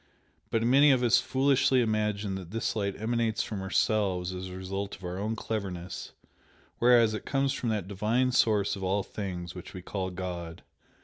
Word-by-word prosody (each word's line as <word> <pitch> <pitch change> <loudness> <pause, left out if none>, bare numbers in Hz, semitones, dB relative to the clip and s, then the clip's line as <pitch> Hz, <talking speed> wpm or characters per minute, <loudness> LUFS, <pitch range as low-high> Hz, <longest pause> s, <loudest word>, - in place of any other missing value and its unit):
But 115 0 +1
many 135 +5 +6
of 130 -3 +4
us 120 0 +5
foolishly 135 +1 +3
imagine 105 -3 0
that 95 -3 -6
this 115 +3 -2
light 100 -2 -2
emanates 115 0 0
from 105 -3 -5
ourselves 95 -2 +1
as 90 0 -5
a 90 0 -7
result 95 +2 -4
of 95 - -17
our 90 +1 -4
own 110 +3 -1
cleverness, 95 -6 -5 0.7
whereas 120 -2 +5
it 110 - -4
comes 135 -1 0
from 120 - -2
that 105 -4 -1
Divine 110 +6 +1
Source 105 -5 +2
of 95 - -7
all 95 +2 +1
things, 90 -5 -5
which 90 0 -10
we 90 - -7
call 95 -1 -3
God. 90 -2 -6
105 Hz, 180 wpm, -29 LUFS, 95-115 Hz, 0.7 s, many